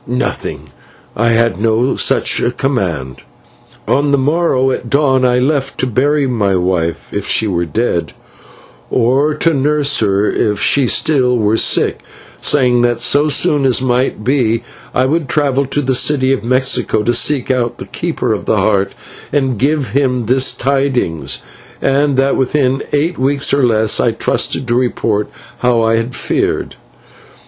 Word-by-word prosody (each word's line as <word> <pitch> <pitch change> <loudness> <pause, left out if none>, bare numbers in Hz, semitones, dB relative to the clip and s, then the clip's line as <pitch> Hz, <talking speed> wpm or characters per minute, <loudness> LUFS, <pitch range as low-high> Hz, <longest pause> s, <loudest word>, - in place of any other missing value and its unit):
"Nothing; 125 +2 -4 0.4
I 115 +2 0
had 115 -3 +1
no 115 +4 +1
such - - +2 0.2
command. 85 - -2 0.7
On 145 +2 +1
the 140 - +3
morrow 135 -2 +1
at 120 -2 -4
dawn 135 -2 +2
I 125 -1 +2
left 135 +1 -1
to - - +1
bury 140 +4 +1
my 105 -7 0
wife, 90 -2 -2
if - - -3
she 110 - +2
were 85 -4 -1
dead, 90 0 -2 0.8
or 135 +5 +1
to 165 +2 +1
nurse 145 0 +1
her 100 -1 +1
if 105 -1 0
she 140 +3 +2
still 125 -2 +1
were 110 -1 +1
sick, - - +1 0.4
saying 125 -4 +2
that 120 -1 +1
so 145 +2 +2
soon 150 -1 +2
as 130 -2 +2
might 125 -3 -1
be 120 -3 0 0.3
I 130 - +1
would 150 0 -1
travel 140 -1 +1
to 145 +2 -1
the 130 0 0
city 135 0 +2
of 135 - -3
Mexico 130 -3 +1
to 120 - +1
seek 135 +2 +1
out 120 -2 -1
the - - -8
Keeper - - -3
of - - -5
the - - +1
Heart 100 -2 +1 0.4
and 130 -6 0
give 140 -1 0
him 125 -2 0
this 130 +3 +2
tidings, 135 - -1 0.4
and 140 0 +1
that 135 +1 +2
within 135 0 0
eight 155 +3 -1
weeks 140 +2 +1
or 140 - +3
less 110 -3 +2
I - - +1
trusted 130 - -1
to 120 - 0
report 115 -4 -1 0.3
how 120 -1 +2
I 115 0 +2
had 115 +2 -3
fared. - - -2
130 Hz, 160 wpm, -14 LUFS, 115-140 Hz, 0.8 s, the